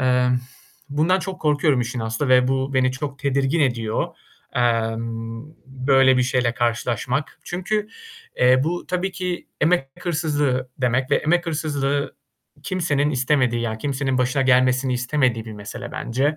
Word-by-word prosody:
eee, 125 Hz, -1 st, +3 dB, 0.6 s
bundan 160 Hz, +6 st, +2 dB
çok 190 Hz, 0 st, -6 dB
korkuyorum 150 Hz, -3 st, +2 dB
işin 120 Hz, +1 st, -3 dB
aslı 110 Hz, +5 st, -2 dB
ve 125 Hz, 0 st, +5 dB
bu 135 Hz, +1 st, -1 dB
beni 130 Hz, 0 st, +3 dB
çok 140 Hz, +1 st, -5 dB
tedirgin 140 Hz, +2 st, +1 dB
ediyor. 115 Hz, -5 st, 0 dB, 0.4 s
Emm, 115 Hz, 0 st, -1 dB, 0.2 s
böyle 135 Hz, 0 st, +3 dB
bir 125 Hz, -, +3 dB
şeyle 125 Hz, -1 st, +1 dB
karşılaşmak. 125 Hz, +3 st, -1 dB
Çünkü, 210 Hz, +4 st, -2 dB, 0.5 s
eee, 130 Hz, +1 st, +5 dB
bu 175 Hz, +3 st, -2 dB
tabii 185 Hz, +1 st, -1 dB
ki 180 Hz, -2 st, -4 dB
emek 155 Hz, -4 st, +2 dB
hırsızlığı 150 Hz, -7 st, 0 dB
demek 130 Hz, +1 st, 0 dB
ve -, -, +5 dB
emek 175 Hz, +3 st, +1 dB
hırsızlığı 145 Hz, -3 st, -1 dB, 0.5 s
kimsenin 150 Hz, -6 st, 0 dB
istemediği, 130 Hz, -3 st, +1 dB
ya, 110 Hz, -1 st, -3 dB
kimsenin 135 Hz, 0 st, -1 dB
başına 130 Hz, +2 st, +1 dB
gelmesini 130 Hz, 0 st, +3 dB
istemediği 125 Hz, -2 st, 0 dB
bir 110 Hz, -, -8 dB
mesele 105 Hz, 0 st, -8 dB
bence. 140 Hz, +6 st, -1 dB
130 Hz, 140 wpm, -22 LUFS, 125-150 Hz, 0.6 s, ve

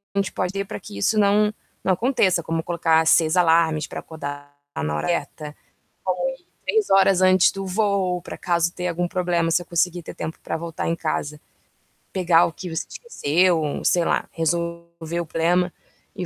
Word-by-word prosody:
gente 195 Hz, -1 st, 0 dB
pode 185 Hz, +1 st, -2 dB
ter 195 Hz, 0 st, -2 dB
para -, -, -7 dB
que 100 Hz, -, -10 dB
isso 215 Hz, -, +1 dB
não 210 Hz, +1 st, +3 dB, 0.3 s
não 190 Hz, -, +3 dB
aconteça, 200 Hz, -5 st, +2 dB
como 165 Hz, 0 st, -2 dB
colocar 165 Hz, -1 st, +2 dB
6 160 Hz, +1 st, +4 dB
alarmes 165 Hz, -3 st, +3 dB
para -, -, -6 dB
acordar 145 Hz, -2 st, -8 dB, 0.2 s
na 75 Hz, 0 st, -2 dB
hora -, -, -2 dB
certa, 155 Hz, -2 st, -2 dB, 1.0 s
põe -, -, -42 dB
3 440 Hz, -2 st, +1 dB
horas 195 Hz, -1 st, +5 dB
antes 185 Hz, -1 st, +5 dB
do 195 Hz, 0 st, -6 dB
voo, 190 Hz, -2 st, 0 dB
pra -, -, -8 dB
caso 170 Hz, -1 st, 0 dB
ter 180 Hz, 0 st, -3 dB
algum 175 Hz, 0 st, -1 dB
problema, 175 Hz, -3 st, 0 dB
você 175 Hz, -, +2 dB
conseguir 175 Hz, +1 st, 0 dB
ter -, -, -9 dB
tempo 160 Hz, +1 st, -6 dB
para -, -, -3 dB
voltar 165 Hz, -1 st, -4 dB
em 165 Hz, -, +1 dB
casa, 150 Hz, -2 st, -3 dB, 0.7 s
pegar 175 Hz, -2 st, +4 dB
o -, -, -3 dB
que 180 Hz, -, -7 dB
você 160 Hz, -, -3 dB
esqueceu, 170 Hz, -, 0 dB
sei 175 Hz, -1 st, +3 dB
lá, -, -, 0 dB
resolver 170 Hz, 0 st, -3 dB
o 170 Hz, -, -5 dB
problema 175 Hz, +3 st, +1 dB, 0.4 s
e 185 Hz, -3 st, -4 dB
170 Hz, 175 wpm, -23 LUFS, 160-185 Hz, 1.0 s, horas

